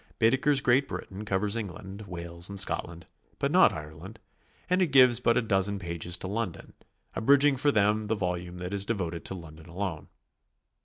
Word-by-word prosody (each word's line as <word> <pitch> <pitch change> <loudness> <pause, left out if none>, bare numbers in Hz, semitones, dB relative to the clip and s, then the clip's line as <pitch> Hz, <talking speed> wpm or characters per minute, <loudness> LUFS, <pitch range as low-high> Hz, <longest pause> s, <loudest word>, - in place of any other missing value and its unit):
Baedeker's 135 +4 +3
Great 130 +2 +3
Britain 100 +2 -7
covers 100 +1 0
England, 100 -1 -7
Wales 85 -1 -4
and 100 -1 0
Scotland, 85 -3 -3 0.3
but - - -1
not - - +6
Ireland; 80 +8 -9 0.5
and 180 +1 +2
it 180 - +3
gives 130 -4 +6
but 115 -1 +2
a - - +2
dozen 100 -1 +1
pages 85 -1 -2
to - - -6
London, 100 -3 -4 0.4
abridging 140 +4 +4
for 140 +3 +2
them 105 -1 +1
the 110 - 0
volume 90 -2 -4
that 90 +2 -5
is 100 -1 -1
devoted 90 -6 -3
to 95 - -4
London 80 -2 -12
alone. 85 -3 -5
100 Hz, 170 wpm, -28 LUFS, 90-115 Hz, 0.5 s, not